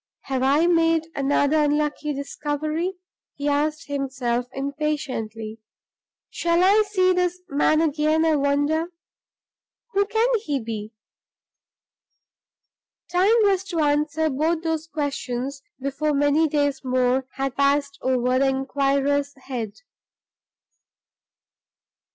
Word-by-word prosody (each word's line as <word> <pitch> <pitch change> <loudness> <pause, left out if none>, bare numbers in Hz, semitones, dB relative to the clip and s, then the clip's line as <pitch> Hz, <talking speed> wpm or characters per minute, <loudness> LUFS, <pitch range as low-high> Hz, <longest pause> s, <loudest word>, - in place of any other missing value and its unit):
"Have 265 -2 -2
I 280 +5 +3
made 330 -2 +3
another 285 +2 +2
unlucky 295 0 0
discovery?" 300 +5 -3 0.4
he 285 - -3
asked 300 +2 0
himself, 260 -4 -2
impatiently. 265 -6 -3 0.7
"Shall 340 +1 +1
I 405 +3 +5
see 370 -2 +3
this 360 0 0
man 310 +2 +3
again, 310 +1 +2
I 320 -1 +3
wonder? 290 +4 +1 1.0
Who 400 +1 +2
can 445 +3 +2
he 295 -10 -2
be?" 220 -2 -6 2.2
Time 375 +6 +4
was 390 -2 +2
to 355 -4 -3
answer 300 +1 +1
both 320 +4 0
those 325 -1 -2
questions 275 -3 -3 0.2
before 275 +3 -1
many 290 +3 +3
days 285 -2 0
more 255 0 +1
had 270 -1 -2
passed 280 0 +1
over 255 0 +1
the 275 - +3
inquirer's 275 +1 0
head. 245 -6 -5
290 Hz, 105 wpm, -23 LUFS, 270-320 Hz, 2.2 s, I